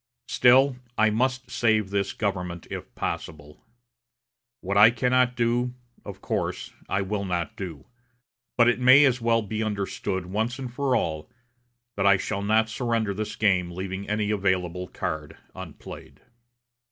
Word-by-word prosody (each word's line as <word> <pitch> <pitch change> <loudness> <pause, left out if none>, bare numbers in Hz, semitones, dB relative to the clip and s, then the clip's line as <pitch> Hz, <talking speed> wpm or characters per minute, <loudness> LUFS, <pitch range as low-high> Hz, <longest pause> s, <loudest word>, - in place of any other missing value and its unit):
Still, 130 +2 +5 0.2
I 110 0 +4
must 130 +3 -1
save 110 -4 +1
this 100 -1 0
government 90 -5 -3
if - - -7
possible. 75 -1 -6 1.0
What 100 +2 -3
I 105 +2 +8
cannot 125 +1 +1
do, 120 +1 0 0.3
of - - -9
course - - -3 0.2
I 95 0 0
will 100 +1 -3
not 90 +2 -3
do; 85 -9 -7 0.7
but 120 -1 +5
it 120 - +2
may 130 +3 +7
as 130 -2 +1
well 115 -1 +2
be 110 +1 -4
understood, 100 -3 -3
once 110 +6 -2
for 130 0 -2
all, 80 -1 -2 0.7
that 100 0 +2
I 100 -1 +6
shall 100 +1 -3
not 110 +2 +2
surrender 115 -3 -1
this 105 +2 -4
game 95 -4 +2
leaving 95 +2 -6
any 105 0 0
available 90 -3 -1
card 80 -2 -5 0.2
unplayed." 95 -5 -10
105 Hz, 140 wpm, -25 LUFS, 95-120 Hz, 1.0 s, I